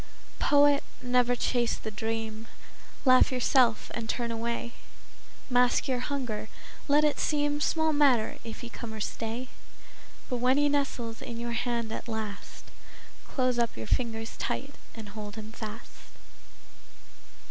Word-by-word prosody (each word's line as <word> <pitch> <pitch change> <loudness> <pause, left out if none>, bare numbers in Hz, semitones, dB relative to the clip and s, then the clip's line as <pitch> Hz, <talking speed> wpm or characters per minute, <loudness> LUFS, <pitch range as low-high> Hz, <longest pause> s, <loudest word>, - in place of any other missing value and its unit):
Poet, 285 0 +5 0.2
never 245 0 +3
chase 240 -1 +1
the 220 - -6
dream. 225 +1 -3 0.6
Laugh 255 0 +6
yourself 250 -2 +3
and 225 -2 -4
turn 235 0 -1
away. 235 +1 -3 0.7
Mask 245 -1 +3
your 255 -2 +1
hunger; 245 -5 -3 0.4
let 295 +1 +5
it 300 -1 +2
seem 295 -1 +1
Small 315 0 +2
matter 270 -7 +3
if 230 -2 -7
he 240 - -6
come 225 -1 -7
or - - -6
stay; 230 +4 -3 0.8
But 250 - -1
when 250 +3 +3
he 290 0 +4
nestles 260 -5 -1
in 230 -1 -6
your 235 0 -3
hand 235 -1 -1
at - - -5
last, 220 -3 -5 0.6
Close 255 -2 +1
up 235 - 0
your 110 - -5
fingers 225 - -1
tight - - -3 0.2
and 220 -3 -8
hold 210 0 -7
him 220 0 -7
fast. 225 0 -7
235 Hz, 140 wpm, -29 LUFS, 225-255 Hz, 0.8 s, Laugh